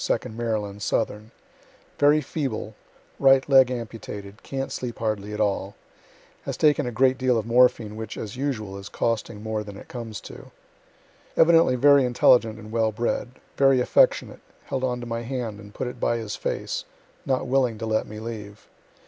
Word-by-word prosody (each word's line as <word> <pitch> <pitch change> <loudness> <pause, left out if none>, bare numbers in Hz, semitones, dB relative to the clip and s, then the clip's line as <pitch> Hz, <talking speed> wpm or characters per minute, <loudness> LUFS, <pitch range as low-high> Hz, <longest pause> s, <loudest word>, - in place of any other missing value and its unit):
P., - - 0
(2d - - -5
Maryland, 105 -3 -3
southern,) 105 0 -1 0.7
very 145 +1 +5
feeble, 130 -7 -4 0.5
right 135 -1 +5
leg 135 -3 +6
amputated, 110 -4 -7
can't 135 0 -4
sleep 125 -2 -5
hardly 105 -2 -2
at 105 - -5
all 100 -1 -1 0.7
has - - -5
taken 150 -4 +3
a - - -2
great 130 +3 +2
deal 130 -2 +2
of 110 - -2
morphine, 115 -3 +3
which, 110 -1 -6
as 105 +1 -6
usual, 110 -8 -3
is 100 - -9
costing 110 -2 -2
more 110 -1 -2
than 105 -1 -9
it - - -12
comes 115 -4 -6
to. - - -11 0.9
Evidently 165 -5 +5
very 140 +2 +6
intelligent 120 -2 +4
and 110 -1 -11
well 110 -1 +1
bred 120 +3 -1 0.3
very 135 -1 +5
affectionate - - +2 0.2
held 130 -1 -3
on 125 -1 -1
to - - -6
my 115 0 -3
hand, 120 -4 -4
and 105 0 -13
put - - -3
it 125 0 -6
by 120 - +1
his 110 -3 -4
face, - - -3 0.4
not 130 -1 0
willing 125 -3 +1
to 115 - -4
let 110 0 0
me 105 - -9
leave. 110 -2 -8
115 Hz, 175 wpm, -25 LUFS, 110-130 Hz, 0.9 s, leg